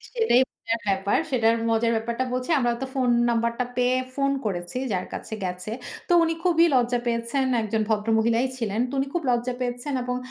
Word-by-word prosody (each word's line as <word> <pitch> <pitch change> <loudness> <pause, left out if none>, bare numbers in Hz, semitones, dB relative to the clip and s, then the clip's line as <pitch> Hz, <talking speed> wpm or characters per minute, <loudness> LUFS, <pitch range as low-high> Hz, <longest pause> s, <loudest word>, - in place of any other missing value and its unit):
সেটাই 450 - +4
মজার 230 0 -3
ব্যাপার। 195 +1 +1
সেটার 230 -2 +3
মজার 230 +1 +2
ব্যাপারটা 235 +3 -1
বলছি। 255 +4 -3
আমরা 240 -1 +2
তো - - -1
ফোন 255 -2 +2 0.2
নাম্বারটা 235 +1 0
পেয়ে 250 +1 +2 0.2
ফোন 275 0 +1
করেছি 175 +2 -3
যার 185 -1 -1
কাছে - - -6
গেছে। 180 +3 -4 0.4
তো - - -2
উনি 330 0 +1
খুবই 340 -2 +4
লজ্জা 245 0 +2
পেয়েছেন। 235 +3 0 0.2
একজন 220 0 -1
ভদ্র 215 0 0
মহিলাই 230 +3 +2
ছিলেন। 225 -1 -1
তো - - -9
উনি 275 - 0
খুব 345 - 0
লজ্জা 240 +1 0
পেয়েছেন 245 +3 -3
এবং 250 0 -2
235 Hz, 185 wpm, -25 LUFS, 225-255 Hz, 0.4 s, সেটাই